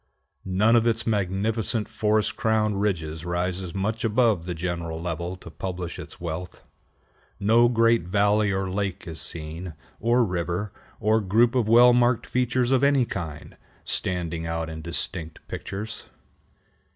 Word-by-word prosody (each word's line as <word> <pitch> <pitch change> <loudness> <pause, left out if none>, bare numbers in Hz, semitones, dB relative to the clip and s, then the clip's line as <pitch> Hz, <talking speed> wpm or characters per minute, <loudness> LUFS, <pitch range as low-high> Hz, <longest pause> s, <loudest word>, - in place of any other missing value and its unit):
None 105 +5 +3
of 115 0 +4
its 115 0 +1
magnificent 105 +2 0
forest 110 0 +1
crowned 110 -4 +1
ridges 80 -6 -2
rises 90 +1 -2
much 110 +3 -2
above 110 -6 +2
the 90 - -3
general 85 -1 -3
level 85 +1 -3
to 85 -3 -12
publish 90 -1 -5
its - - -10
wealth. 85 +1 -6 0.8
No 115 +4 +5
great 115 -4 +3
valley 105 +2 +2
or 95 0 -1
lake 95 0 -3
is 80 -1 -2
seen, 80 +1 -6 0.2
or 120 +2 +3
river, 90 +2 -2 0.3
or 110 +1 +2
group 115 +5 +3
of 125 -4 +1
well 120 +2 +7
marked 120 -1 +3
features 125 0 0
of 130 0 +3
any 140 -3 +4
kind, 80 -8 -6 0.3
standing 85 -3 -1
out 80 -1 -3
in 80 0 -7
distinct 85 0 -3
pictures. 105 +3 -6
100 Hz, 140 wpm, -25 LUFS, 85-115 Hz, 0.8 s, well